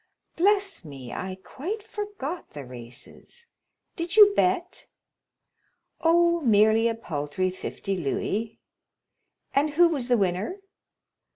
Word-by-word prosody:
"Bless 390 - +2
me, 135 -6 -9
I 185 0 -5
quite 385 - -5
forgot 410 -7 -6
the 145 -2 -7
races. 125 - -11 0.5
Did 340 +1 -3
you 415 -2 +8
bet?" 365 -1 0 1.1
"Oh, 340 +1 +3
merely 220 -2 +4
a 230 - 0
paltry 175 -2 -2
fifty 195 +1 -4
louis." 200 +7 -2 1.0
"And 290 +2 +2
who 345 +2 +7
was 275 -7 -2
the 245 -1 +3
winner?" 195 - -1
245 Hz, 110 wpm, -26 LUFS, -, 1.1 s, you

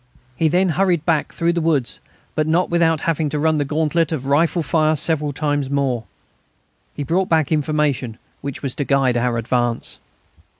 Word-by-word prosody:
He 160 - +2
then 180 +4 +2
hurried 175 -2 +1
back 160 -4 +1
through 170 +1 0
the 170 - -1
woods, 140 -10 0 0.3
but 155 0 0
not 170 +3 +1
without 165 -2 +2
having 160 -2 0
to 150 - -2
run 155 +1 +2
the 145 - 0
gauntlet 160 +3 0
of 145 -5 -3
rifle 160 +4 +2
fire 155 +1 +2
several 150 0 0
times 145 -1 -1
more. 135 -5 -1 0.9
He 145 - -3
brought 180 +6 0
back 160 -3 +2
information 150 -6 0 0.2
which 140 0 -6
was 135 -3 -2
to 145 - -2
guide 135 -3 +2
our 120 0 0
advance. 120 0 -1
150 Hz, 175 wpm, -20 LUFS, 135-165 Hz, 0.9 s, He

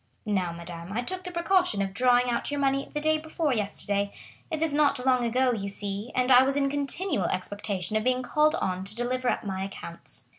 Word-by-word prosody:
Now, 190 -5 0
madame, 170 +1 -8
I 240 +3 -1
took 370 +7 -4
the 360 - -6
precaution 350 - +2
of 195 -1 -1
drawing 250 +2 +4
out 240 -1 -1
your 290 0 -2
money 275 0 +1
the 295 - -2
day 310 +1 +2
before 315 -2 -1
yesterday; 200 -2 -1 0.4
it 320 -1 -1
is 320 -3 +3
not 285 -3 +2
long 255 -2 +3
ago, 250 +2 +2
you 200 -3 -3
see, 200 +3 -5
and 255 +1 +2
I 250 0 +9
was 270 +1 +2
in 275 -1 +1
continual 285 - 0
expectation 200 +1 -3
of 215 - +1
being 255 +1 +1
called 305 +4 +3
on 185 - -2
to 200 +2 -2
deliver 250 +1 -1
up - - -1
my 190 -2 -3
accounts. 180 -3 -6
250 Hz, 215 wpm, -27 LUFS, 200-285 Hz, 0.4 s, I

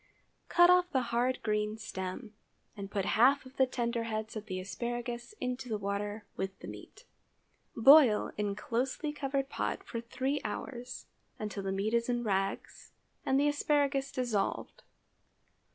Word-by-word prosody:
Cut 350 0 +7
off 360 0 +4
the 265 -6 +1
hard 250 +2 +1
green 210 0 0
stem, 190 0 -6 0.4
and 200 -2 -6
put 200 -2 -1
half 265 +7 +4
of 260 +1 -14
the 265 - +4
tender 235 -2 -1
heads 220 0 -4
of 215 0 -6
the 185 -2 -3
asparagus 240 - -4
into 250 0 -3
the 215 - 0
water 205 +1 -3
with 190 0 -4
the - - -10
meat. - - -11 0.7
Boil 260 -2 +7
in 205 -1 -1
closely 255 +7 -2
covered 275 -1 -1
pot - - -3
for 230 - -5
three 265 +4 -2
hours, 250 -1 -6 0.3
until 210 -1 -4
the 195 0 -2
meat 200 +3 -1
is 235 +1 +1
in 240 -1 0
rags 195 -2 -2 0.3
and 265 +1 +3
the 290 - +3
asparagus 285 -2 +1
dissolved. 240 -7 -2
235 Hz, 150 wpm, -31 LUFS, 210-265 Hz, 0.7 s, Cut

